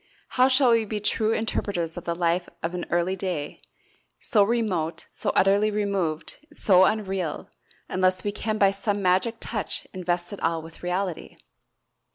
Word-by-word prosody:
How 255 0 +4
shall 260 -1 +5
we 230 -1 +4
be 215 0 -3
true 215 +1 +1
interpreters 200 -7 -1
of 175 - -7
the 170 - -1
life 175 +1 0
of 165 +2 -2
an 180 -1 -4
early 175 +2 +1
day, 180 -6 -4 0.6
so 210 - +2
remote, 190 -8 -1
so - - -2
utterly 200 +2 +4
removed, 195 -7 -2
so 190 -10 +5
unreal, 190 -6 -2 0.4
unless 185 0 +1
we 205 - -1
can 215 +1 -2
by 195 -2 +5
some 200 0 -2
magic 185 +6 +2
touch 210 -3 -2
invest 175 0 -2
it 200 - -8
all 165 -1 0
with 160 0 -12
reality? 180 -1 -3
190 Hz, 160 wpm, -25 LUFS, 175-210 Hz, 0.6 s, shall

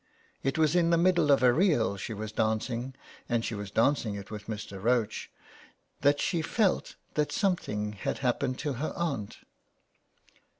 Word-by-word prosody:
It 135 +2 -1
was 155 0 +3
in 170 -1 +4
the 170 - +4
middle 175 -3 +3
of 135 -2 +4
a 125 -1 +6
reel 150 - +2
she 100 - -6
was 110 +1 -5
dancing, 115 +4 -1 0.3
and 120 -2 +1
she - - -3
was 100 -2 -5
dancing 115 0 +1
it 100 0 -8
with 105 -1 -7
Mr. 105 -3 -6
Roche, 120 -2 +1 0.7
that 145 +1 +3
she 170 -3 0
felt 200 +4 0 0.2
that 150 -2 0
some 195 -3 +2
thing 105 -9 -4
had 100 - -3
happened 130 0 0
to 145 -2 -2
her 145 +5 -3
aunt. 140 -12 -3
125 Hz, 170 wpm, -29 LUFS, 110-155 Hz, 0.7 s, a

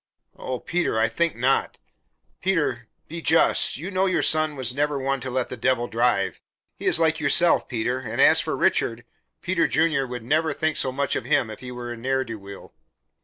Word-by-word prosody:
"Oh, 130 -1 -5
Peter, 175 -9 -1
I 110 +1 +3
think 165 +9 -1
not. 130 +3 0 0.6
Peter, 150 -11 -1 0.2
be 165 +2 -7
just. 165 -5 +3
You 175 +8 -6
know 190 0 +1
your 185 - +1
son 155 -1 +1
was 130 -3 -1
never 145 +1 0
one 135 0 -1
to 130 +1 -6
let 130 0 -2
the - - -5
Devil 120 +1 0
drive; 120 -4 0 0.3
he - - -5
is - - +5
like 160 -1 +2
yourself, 170 +4 +3
Peter. 125 +1 -2
And - - -6
as - - +6
for - - -3
Richard, 115 +1 0 0.4
Peter 185 -2 +1
Junior 155 -5 +1
would 125 -1 -7
never 155 +5 +1
think 155 +1 -1
so 130 - +1
much 140 +1 -1
of 120 - -3
him 120 -4 +1
if 110 - -9
he 125 -1 -8
were 120 -1 -7
a 120 - -6
ne'er 130 +3 -1
do 115 -3 -8
weel." 100 0 -12
130 Hz, 205 wpm, -24 LUFS, 120-155 Hz, 0.6 s, as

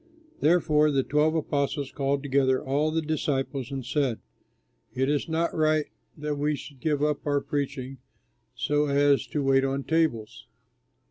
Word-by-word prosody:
Therefore 155 -2 +3
the 135 -2 +1
twelve 150 +3 +2
apostles 140 -3 -1
called 140 0 -1
together 130 -2 +2
all 145 +3 0
the 160 +1 -1
disciples 140 -4 -2
and 135 -3 -5
said, 135 -3 0 0.8
"It 130 +2 +1
is 145 +2 0
not 165 +1 0
right 155 -1 +2 0.3
that 150 -1 -3
we 150 +1 +1
should 140 -1 -11
give 150 0 0
up 150 -1 0
our 145 -1 +2
preaching 135 -2 -4 0.6
so 150 +1 +1
as 140 0 +3
to 150 - -2
wait 135 0 +3
on 135 0 -1
tables. 120 -10 -1
145 Hz, 150 wpm, -26 LUFS, 135-150 Hz, 0.8 s, Therefore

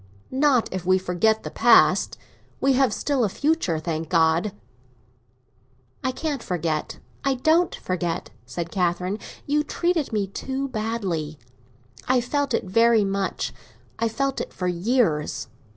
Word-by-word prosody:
"Not 265 -3 +3
if 185 -1 -3
we 185 +1 +4
forget 190 +4 +1
the - - -6
past. 235 0 +4 0.4
We 275 0 +3
have 265 0 +3
still 280 -4 0
a 210 - +2
future, 290 - 0
thank 160 0 -3
God!" 165 +3 +3 1.5
"I 260 - +1
can't 285 0 -3
forget—I 170 - -3
don't 320 +7 +2
forget," 175 -2 -3 0.2
said 170 -1 -5
Catherine. 180 +2 0 0.3
"You 295 +1 +2
treated 340 -2 0
me 210 -3 0
too 265 +7 -4
badly. 200 -10 -3 0.7
I 255 0 +4
felt 275 +1 0
it - - -1
very 230 +3 +4
much; 195 -1 -2 0.5
I 230 - +1
felt 275 +4 -1
it - - -6
for 180 - -3
years." 175 - 0
220 Hz, 135 wpm, -24 LUFS, 180-265 Hz, 1.5 s, we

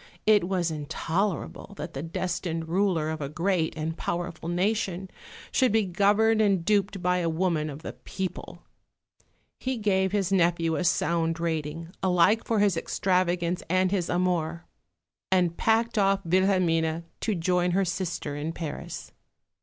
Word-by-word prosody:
It 210 -4 +5
was 180 -3 0
intolerable 170 +6 -3
that 170 - -6
the 135 - -4
destined 165 0 -3
ruler 170 -3 +1
of 160 -1 -5
a 140 - -3
great 170 +1 0
and 160 +1 -2
powerful 170 -1 -4
nation 190 0 -1 0.4
should 255 -4 +3
be 220 -1 +3
governed 210 +4 +3
and 195 -5 +2
duped 200 -2 +1
by 180 0 +2
a 170 -1 0
woman 160 -2 0
of 145 +2 -8
the - - -5
people. 190 -1 -6 1.0
He 260 -1 -2
gave 190 -3 +1
his 195 -2 0
nephew 170 -3 +2
a 185 - -1
sound 165 -1 +1
rating 165 0 -3
alike 190 +4 +3
for 225 - 0
his 205 -3 +3
extravagance 180 0 0
and 185 +1 +2
his 185 -4 0
amour; 175 -2 0 0.7
and 180 -3 +3
packed 225 +2 +2
off 195 -1 +2
Wilhelmine 170 -3 +2 0.2
to 215 - -1
join 180 +1 +1
her 195 - +3
sister 170 -5 -3
in 150 +3 -3
Paris. 160 -3 -6
180 Hz, 145 wpm, -27 LUFS, 165-195 Hz, 1.0 s, It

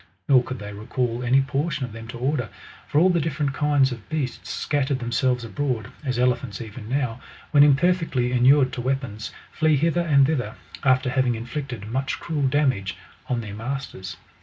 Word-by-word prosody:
Nor 130 -3 +6
could 130 +1 -6
they 105 -1 -7
recall 115 +3 -2
any 125 +2 +4
portion 140 +1 -1
of 125 - -10
them 115 +1 -9
to 120 - -7
order; 140 +5 -1 0.4
for - - -1
all 185 +3 +5
the 175 - +2
different 145 -2 -1
kinds 145 -2 +3
of 115 -4 -8
beasts 150 -5 -3
scattered 140 -2 0
themselves 125 0 0
abroad; 120 -2 -2
as 130 -4 -1
ele 125 0 +4
phants 115 -6 -8
even 110 0 -8
now, 125 -3 -1 0.3
when 145 - +6
imperfectly 145 -3 +3
inured 130 +1 +5
to 125 - -3
weapons, 125 -5 -2 0.2
flee 155 -2 +3
hither 165 +4 +2
and 140 -5 +5
thither, 125 -8 -1 0.3
after 130 -1 +3
having 130 -3 +2
inflicted 120 -1 -5
much 130 +5 -2
cruel 150 -5 -1
damage 130 - +1 0.3
on 125 -2 0
their 105 -3 -7
masters. 110 -6 -5
130 Hz, 180 wpm, -24 LUFS, 120-145 Hz, 0.4 s, Nor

